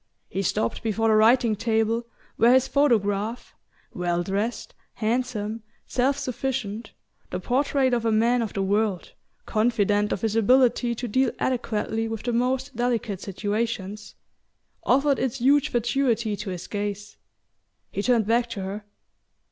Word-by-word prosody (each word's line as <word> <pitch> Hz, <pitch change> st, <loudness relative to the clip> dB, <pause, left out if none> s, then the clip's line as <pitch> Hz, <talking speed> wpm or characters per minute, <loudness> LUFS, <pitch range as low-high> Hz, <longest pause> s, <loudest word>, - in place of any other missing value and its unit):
He 195 Hz, -, -2 dB
stopped 115 Hz, -10 st, -1 dB
before 225 Hz, 0 st, 0 dB
the -, -, +4 dB
writing 225 Hz, +1 st, +4 dB
table, 225 Hz, +2 st, 0 dB, 0.3 s
where 235 Hz, +2 st, +5 dB
his 260 Hz, +1 st, +4 dB
photograph, 225 Hz, -5 st, +1 dB, 0.4 s
well 175 Hz, -1 st, -1 dB
dressed, 205 Hz, +6 st, -3 dB, 0.2 s
handsome, 225 Hz, -1 st, -2 dB, 0.2 s
self 265 Hz, +2 st, +1 dB
sufficient 245 Hz, -5 st, -4 dB, 0.4 s
the 180 Hz, -, -3 dB
portrait 260 Hz, +4 st, +1 dB
of 235 Hz, -2 st, +1 dB
a 225 Hz, -, +1 dB
man 235 Hz, +3 st, +3 dB
of 220 Hz, -4 st, -3 dB
the 195 Hz, -2 st, -1 dB
world, 200 Hz, -1 st, 0 dB, 0.3 s
confident 210 Hz, -2 st, +1 dB
of 190 Hz, -, -2 dB
his 220 Hz, -1 st, -1 dB
ability 240 Hz, +1 st, +3 dB
to 245 Hz, +2 st, -4 dB
deal 260 Hz, +3 st, +2 dB
adequately 225 Hz, -3 st, -1 dB
with 225 Hz, -1 st, -5 dB
the 240 Hz, -, -1 dB
most 255 Hz, +2 st, 0 dB
delicate 235 Hz, -5 st, -1 dB
situations 210 Hz, 0 st, -3 dB, 0.7 s
offered 275 Hz, +2 st, +3 dB
its 260 Hz, 0 st, -1 dB
huge 280 Hz, +3 st, +3 dB
fatuity 235 Hz, -2 st, 0 dB
to 200 Hz, -, -6 dB
his 180 Hz, -2 st, -5 dB
gaze. 205 Hz, 0 st, -5 dB, 0.7 s
He 200 Hz, -, -2 dB
turned 235 Hz, -1 st, +2 dB
back 235 Hz, +2 st, +1 dB
to 210 Hz, -4 st, -5 dB
her. 200 Hz, +2 st, -6 dB
225 Hz, 140 wpm, -25 LUFS, 205-245 Hz, 0.7 s, where